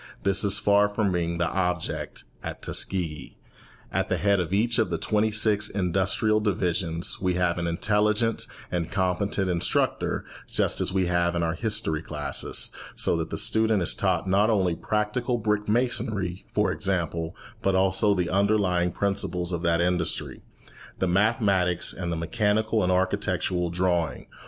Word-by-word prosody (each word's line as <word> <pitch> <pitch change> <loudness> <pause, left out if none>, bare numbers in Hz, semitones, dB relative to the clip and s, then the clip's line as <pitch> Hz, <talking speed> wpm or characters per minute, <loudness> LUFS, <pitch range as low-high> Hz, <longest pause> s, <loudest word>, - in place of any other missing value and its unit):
This 100 -1 +3
is 100 0 +3
far 100 0 +3
from 105 -1 0
being 85 -1 -1
the 85 0 +1
object 90 -3 -2 0.2
at - - -7
Tuskegee. 85 -6 -2 0.6
At - - 0
the - - +1
head 100 -1 +2
of 90 -1 -2
each 115 +5 +2
of 110 - +2
the 85 - -1
twenty 110 +3 +1
six 105 -1 +2
industrial 95 +3 +1
divisions 90 -4 -1
we 90 -1 +1
have 90 -1 +1
an 85 - -2
intelligent 105 +5 +1 0.2
and 85 -2 -2
competent 95 +1 0
instructor, 85 -2 0 0.2
just - - 0
as - - 0
we 95 -1 +1
have 85 0 +1
in 85 - 0
our 80 0 0
history 85 -6 -1
classes, 75 -2 -3 0.2
so - - +1
that 80 -1 -3
the - - -4
student 110 -3 +2
is - - +4
taught 95 -2 0
not 100 +4 +3
only 95 -5 +2
practical 110 +6 -1
brick 105 -2 -1
masonry, 105 -6 -1
for 105 0 +1
example, 85 -4 -2 0.3
but 95 -1 +1
also 95 +2 +3
the 90 -2 -1
underlying 95 -3 +2
principles 95 -2 -2
of 85 -2 -2
that 85 -1 +2
industry, 90 -1 -1 0.6
the 95 - 0
mathematics 95 -2 +2
and 85 -2 -4
the 85 - -2
mechanical 110 +5 0
and 90 - +1
architectural 90 -1 0
drawing. 85 -5 -1
95 Hz, 155 wpm, -26 LUFS, 85-105 Hz, 0.6 s, is